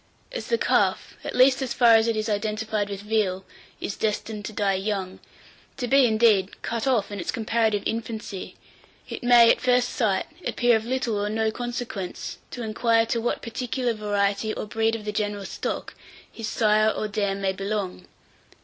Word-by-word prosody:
As - - -5
the 465 - +2
calf, - - +1
at - - -5
least 260 +1 +5
as 260 -2 -2
far 240 -2 +6
as 225 0 +5
it 230 - +1
is 215 0 -1
identified 215 0 -1
with 200 -1 -5
veal, 205 -3 0 0.3
is 200 - -4
destined 215 0 -2
to - - -5
die 200 -2 +1
young, 190 -1 -3 0.6
to 250 -2 -2
be, 270 0 +5
indeed, 215 -4 +3
cut 230 +2 -2
off 230 -6 +1
in 205 - -5
its 175 - -5
comparative 220 -2 0
infancy, 220 -4 -4 0.5
it - - -6
may, 240 -1 +7
at - - 0
first 250 -1 +3
sight, 210 -6 0 0.2
appear 240 -1 +2
of 220 0 -1
little 235 -4 -1
or 205 - -1
no 220 +1 0
consequence 240 -5 -5
to 245 - -6
inquire 225 +1 +2
to 230 0 -1
what 240 - -2
particular 250 +1 -2
variety, 205 0 0
or - - -4
breed 225 +1 0
of 215 -2 -7
the 210 - -2
general 205 -1 -2
stock, - - -4 0.4
his 225 -2 -6
sire 215 -1 +3
or 215 - -2
dam 200 -1 -1
may 195 -1 0
belong. 195 -2 -4
220 Hz, 180 wpm, -25 LUFS, 205-235 Hz, 0.6 s, may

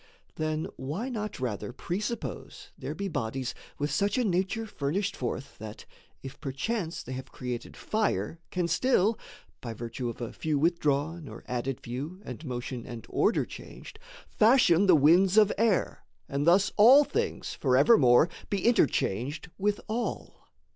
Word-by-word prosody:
Then 155 0 -2
why 160 - -4
not 215 - -4
rather 120 -2 -3
presuppose 205 - -5
there - - -6
be 200 - -3
Bodies 130 -5 -3 0.2
with 145 0 -2
such 200 - +1
a 250 - +2
nature 190 +4 0
furnished 185 0 -2
forth 130 +2 -5
That, 110 0 -9 0.4
if 135 0 -9
perchance 160 - -3
they 130 - -7
have 130 0 -7
created 125 -2 -6
fire, 165 - -1
Can 180 -2 -1
still 215 +3 +2 0.4
(by 115 -2 -6
virtue 120 +2 -4
of 115 - -7
a 120 -2 -5
few 155 -2 -1
withdrawn, 155 0 0
Or - - -10
added 125 +1 -3
few, 140 +10 -6
and 125 +5 -7
motion 125 -3 -5
and 120 -2 -8
order - - +2
changed) - - -11 0.3
Fashion 210 -5 +4
the 180 - +7
winds 175 +7 +5
of 210 -1 +6
air, 220 -2 +1 0.2
and 145 +1 -1
thus 190 +4 +5
all 255 +8 +8
things - - -2
Forevermore 130 - +5 0.2
be 200 -2 -1
interchanged 145 - +1
with 205 +1 +1
all? 225 +1 -4
155 Hz, 145 wpm, -28 LUFS, 130-200 Hz, 0.4 s, all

